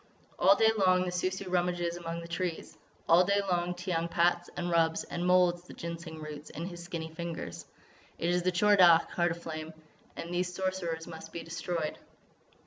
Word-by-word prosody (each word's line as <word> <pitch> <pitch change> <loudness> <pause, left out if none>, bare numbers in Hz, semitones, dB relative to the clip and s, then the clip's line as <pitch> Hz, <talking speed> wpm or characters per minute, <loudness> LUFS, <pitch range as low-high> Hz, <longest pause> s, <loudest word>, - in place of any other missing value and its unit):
"All 195 +2 +7
day 220 +1 +5
long 185 -1 +4
the 180 - -2
Sou 180 +1 0
Sou 190 +1 -6
rummages 175 -1 0
among 170 -1 -5
the 170 - -8
trees; 170 0 -4 0.3
all 170 +2 +7
day 200 +2 +2
long 175 0 0
Tiyang 175 -2 -2
pats 175 +1 +2
and 175 0 -2
rubs 165 -1 +2
and 175 +1 -3
moulds 180 -1 +4
the - - -11
Ginseng 170 -1 -6
roots 150 -1 -8
in 165 - -6
his 175 -1 -7
skinny 165 -3 -6
fingers. 165 - -6 0.5
It 170 - 0
is 180 0 +2
the 185 +1 +1
Tchor 205 +3 +4
Dagh, 170 -2 +7
Heart 175 -1 +1
of 170 - -15
Flame. 155 0 -6 0.4
And 170 +1 -6
these 180 0 0
Sorcerers 180 -3 -2
must 160 -1 -9
be 170 - -6
destroyed." 165 -1 -3
175 Hz, 190 wpm, -30 LUFS, 165-180 Hz, 0.5 s, All